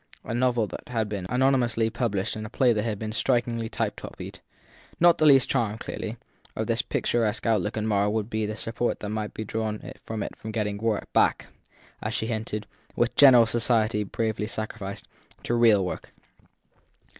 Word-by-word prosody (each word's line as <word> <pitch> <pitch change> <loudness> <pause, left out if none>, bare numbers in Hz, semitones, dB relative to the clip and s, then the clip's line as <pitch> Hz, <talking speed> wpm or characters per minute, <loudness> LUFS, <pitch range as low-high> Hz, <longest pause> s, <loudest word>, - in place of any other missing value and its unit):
a - - -5
novel 120 -2 +2
that - - -9
had 110 -3 -1
been 100 -3 -4
anonymously 125 -3 +2
published 105 -6 -1
and 110 - -5
a 105 - -6
play 125 +1 +3
that 105 - 0
had 110 -2 -2
been 110 +1 -4
strikingly 120 -1 0
type - - -2
copied. - - -9 0.6
Not 170 0 +5
the 155 - +5
least 135 -3 +6
charm, 115 -5 0
clearly, 115 0 -5 0.4
of - - -1
this - - +1
picturesque 115 -2 -1
outlook 105 -2 +1
at 110 - -1
Marr 105 -1 +2
would 105 -1 -1
be 110 -2 -2
the 105 - -4
support 115 +2 -2
that 105 - -4
might 105 0 -4
be 110 - -3
drawn 110 +3 -3
from 110 -2 -4
it - - -6
for 110 - -8
getting 105 -2 -2 0.3
back, - - +2 0.5
as - - -3
she - - -1
hinted, 110 -2 -3 0.3
with 120 0 +1
general 125 -5 +8
society 115 -2 +2
7 105 - -2
bravely 110 -2 -1
sacrificed, 110 -3 -5 0.4
to - - -1
real 115 -5 +5
work. - - -6
110 Hz, 180 wpm, -26 LUFS, 105-120 Hz, 0.6 s, general